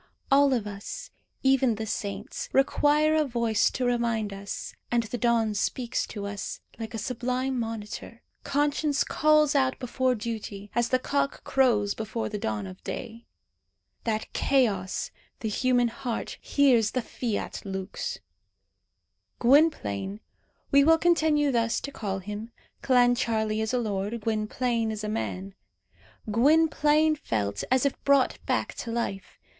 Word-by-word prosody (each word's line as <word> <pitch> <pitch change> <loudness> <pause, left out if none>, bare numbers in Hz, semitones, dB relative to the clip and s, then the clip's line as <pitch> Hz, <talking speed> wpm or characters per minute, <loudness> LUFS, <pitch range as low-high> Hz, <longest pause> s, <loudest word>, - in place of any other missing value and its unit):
All 280 0 +6
of 240 -5 +1
us, 200 -1 -7 0.3
even 265 -3 +4
the 220 +1 -4
saints, 205 -2 -4
require 295 +3 +3
a 310 -1 +3
voice 235 -5 +1
to 255 - -2
remind 235 -4 0
us; 200 +1 -6 0.2
and 240 -1 +2
the 225 +2 -4
dawn 230 -2 +2
speaks 235 +4 -1
to 205 -2 -6
us, 200 0 -5 0.2
like 225 0 -5
a - - -2
sublime 250 +2 -2
monitor. 225 0 -6 0.2
Conscience 290 0 +1
calls 305 -1 +3
out 265 -2 +2
before 255 0 0
duty, 210 -3 -6
as 240 0 +1
the 255 - +3
cock 280 +2 -1
crows 225 -7 +2
before 220 +1 -4
the 210 -1 -4
dawn 105 - -2
of 95 -1 -10
day. 230 -2 -6 0.8
That 220 -2 -2
chaos, 210 -9 +1 0.3
the 220 - -1
human 245 +2 +2
heart, 245 -1 -5
hears 250 -7 +3
the 255 - 0
fiat 225 -1 -3
lux! 190 0 -4 1.2
Gwynplaine 215 - +2 0.5
we 280 0 +6
will 325 +2 +6
continue 315 -4 +3
thus 230 -2 +1
to 280 - -6
call 200 -7 -3
him 210 +4 -6 0.3
(Clancharlie 230 -4 +2
is 220 - -1
a 255 - +1
lord, 210 -1 -2
Gwynplaine 225 +2 0
is 215 -1 -5
a - - -2
man) 195 -3 -3 0.8
Gwynplaine 305 +4 +4
felt 100 - -2
as 260 +1 +3
if 280 - -1
brought 280 -2 +3
back - - 0
to 235 - -5
life. 230 -5 -3
235 Hz, 140 wpm, -27 LUFS, 210-270 Hz, 1.2 s, All